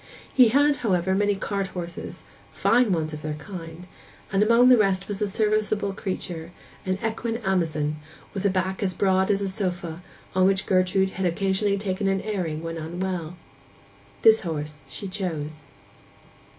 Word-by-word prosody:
He 255 -3 +7
had, 285 +5 +4
however, 190 -5 +1
many 205 +1 +2
cart 195 0 -2
horses, 175 -2 -7 0.3
fine 240 -2 +3
ones 160 -3 0
of 150 - -6
their 155 -1 -3
kind; 165 +1 -8 0.5
and 195 - +2
among 235 +4 +6
the 255 - +9
rest 195 -2 +2
was 205 0 -4
a 210 - +1
serviceable 210 -1 +1
creature, 175 -4 -4 0.4
an 185 0 +1
equine 225 +1 -2
Amazon, 155 -5 0 0.4
with 195 - -3
a 200 - +4
back 190 0 -1
as 185 -3 -1
broad 190 0 +2
as 200 -1 +2
a 200 - 0
sofa, 180 -3 -3 0.3
on 185 0 +4
which 190 0 +1
Gertrude 190 +1 +2
had 190 -1 -1
occasionally 195 +3 +1
taken 195 0 -1
an 195 0 +1
airing 175 -7 -3
when 165 0 -4
unwell. 175 +1 -4 0.9
This 220 0 +7
horse 155 -3 -3
she 165 +9 -5
chose. 155 -6 -4
190 Hz, 160 wpm, -25 LUFS, 170-205 Hz, 0.9 s, the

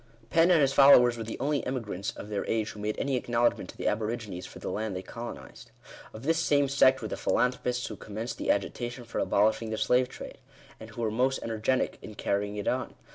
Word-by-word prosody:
Fenn 165 +1 +5
and 170 -4 +5
his 135 -1 +3
followers 125 -3 +7
were 115 - -5
the 110 - -6
only 145 +2 0
emigrants 115 -7 -3
of 105 - -8
their 105 -2 -2
age 110 -1 0
who 105 - -11
made 105 +1 -2
any 135 -3 0
acknow 120 0 0
ledgment - - -3
to - - -11
the - - -2
aborigines 105 -5 -3
for - - -12
the - - -5
land 110 -2 -3
they 95 - -5
colonized. 115 +5 -9 0.4
Of 110 - -10
this 165 +3 +2
same 145 -3 +3
sect 130 -1 +4
were - - -2
the - - -4
philanthropists 125 0 0
who 110 - -6
commenced 110 +4 -6
the - - -3
agitation 120 +5 -1
for 115 - -5
abolishing 110 +2 +2
the 110 - -3
slave 125 +2 +2
trade; - - -10 0.4
and 110 - -10
who 115 +1 -6
were 110 - 0
most 130 +4 +1
energetic 115 +3 -1
in 105 - -10
carrying 100 +1 -1
it 105 - -4
on. - - -1
115 Hz, 225 wpm, -28 LUFS, 105-130 Hz, 0.4 s, followers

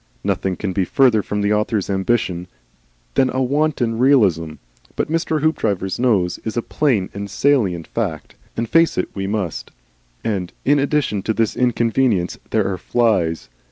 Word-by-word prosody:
Nothing 95 -1 -1
can 95 +1 -3
be 95 - +1
further 115 +2 +3
from 105 +1 -3
the 100 +1 +2
author's 105 -1 0
ambition 95 -3 -1 0.7
than 130 - +3
a 130 +1 0
wanton 130 -4 0
realism, 100 - +3 0.4
but - - -2
Mr. 160 -2 0
Hoopdriver's 105 - 0
nose 105 -8 +1
is 110 +1 -4
a 120 - 0
plain 120 -11 0
and 100 0 -5
salient 100 - +1
fact, - - -4 0.2
and 115 - -1
face 165 +6 +3
it - - -1
we 95 -1 -3
must. 100 -6 -3 0.5
And, 95 -5 -2
in 145 +1 +4
addition 140 -7 0
to 110 +3 -2
this 115 -2 0
inconvenience, 115 -5 +1
there - - +1
are 95 -2 -3
flies. 95 -9 +1
110 Hz, 160 wpm, -20 LUFS, 95-130 Hz, 0.7 s, in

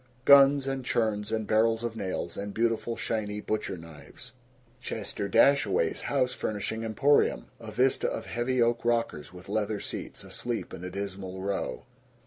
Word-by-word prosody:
Guns 140 0 +7
and 135 -1 -2
churns 110 -3 0
and 110 -1 -1
barrels 115 +2 +2
of 115 -1 -3
nails 95 -4 -3
and 100 0 -5
beautiful 115 0 0
shiny 105 -2 -2
butcher 105 -3 -2
knives. 80 -4 -13 0.5
Chester 105 -4 -4
Dashaway's 105 - +3
House 130 -3 +1
Furnishing 110 +1 -3
Emporium. 135 +6 +2
A 115 -2 -9
vista 130 +5 +2
of 110 - -5
heavy 120 +3 -1
oak 115 0 +1
rockers 115 -11 0
with 90 0 -12
leather 105 -1 -1
seats, - - -6
asleep - - -4
in 85 - -8
a 90 - -4
dismal 95 -1 -5
row. 100 0 -3
110 Hz, 150 wpm, -28 LUFS, 100-120 Hz, 0.5 s, Guns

